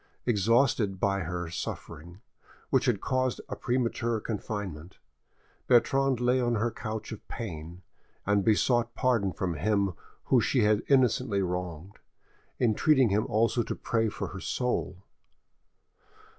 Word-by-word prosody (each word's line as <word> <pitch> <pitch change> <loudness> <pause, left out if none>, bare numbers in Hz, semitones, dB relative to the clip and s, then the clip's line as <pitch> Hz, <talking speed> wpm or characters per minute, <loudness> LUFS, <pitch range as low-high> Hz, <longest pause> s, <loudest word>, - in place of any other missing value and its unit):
Exhausted 115 -2 +2
by 100 0 +1
her 90 -1 -3
suffering, 85 +2 -7 0.5
which - - +3
had - - +2
caused 130 -4 0
a - - -5
premature 120 -2 -1
confinement, 100 -6 -5 0.7
Bertrande 135 +1 +3
lay 125 +1 +2
on 120 -1 +1
her 115 +2 0
couch 110 -2 -6
of 110 - -9
pain, 85 -4 -7 0.4
and 105 0 +2
besought 115 +2 +2
pardon 115 -7 +1
from 90 +1 -2
him 100 +3 0 0.3
whom 130 - +3
she 120 +2 +2
had 105 0 +3
innocently 125 -6 +2
wronged, 90 0 -5 0.6
entreating 130 +2 +3
him 105 +2 +1
also 115 +3 +2
to - - -3
pray 115 -1 0
for 100 -2 -5
her 95 - -7
soul. 100 -5 -2
110 Hz, 130 wpm, -28 LUFS, 95-120 Hz, 0.7 s, which